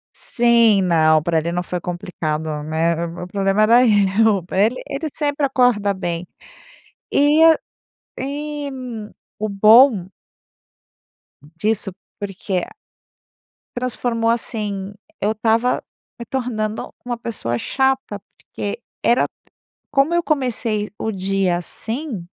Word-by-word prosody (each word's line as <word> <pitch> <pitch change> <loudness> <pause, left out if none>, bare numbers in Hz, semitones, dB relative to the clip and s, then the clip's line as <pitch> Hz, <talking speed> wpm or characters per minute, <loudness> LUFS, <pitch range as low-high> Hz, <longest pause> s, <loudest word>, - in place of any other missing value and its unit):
Sim, 235 -4 +4
não. 155 -3 +4
Pra 165 +1 0
ele 165 +2 -1
não 175 +1 -2
foi 180 0 -4
complicado, 160 -4 -4
né? 165 +2 0
O 170 +1 -7
o - - -7
problema 195 +2 +1
era 235 +3 +6
eu. 205 -2 +3
Pra 190 +2 0
ele 225 +4 +2
ele 295 +3 -3
sempre 290 -1 0
acorda 245 -7 +2
bem. 175 -2 -4 0.8
E 295 +2 +4 0.8
e 290 +2 -4
e - - -5 0.7
o 215 - -1
bom 215 -1 +6 1.3
disso 195 +7 -2 0.3
porque 195 -2 -3 1.1
transformou, 235 -2 0
assim, 205 -4 -3 0.3
eu 210 +2 +1
estava 225 +3 +1 0.4
me 235 - -6
tornando 225 -5 -3
uma 245 - -2
pessoa 210 - -3
chata. 265 - 0 0.2
Porque 205 +3 -6 0.3
era 240 - +3 0.7
como 285 +4 +3
eu 345 - +2
comecei 235 -8 -1
o 220 - -2
dia 190 -2 0
assim, 225 - -4
210 Hz, 115 wpm, -20 LUFS, 180-245 Hz, 1.3 s, era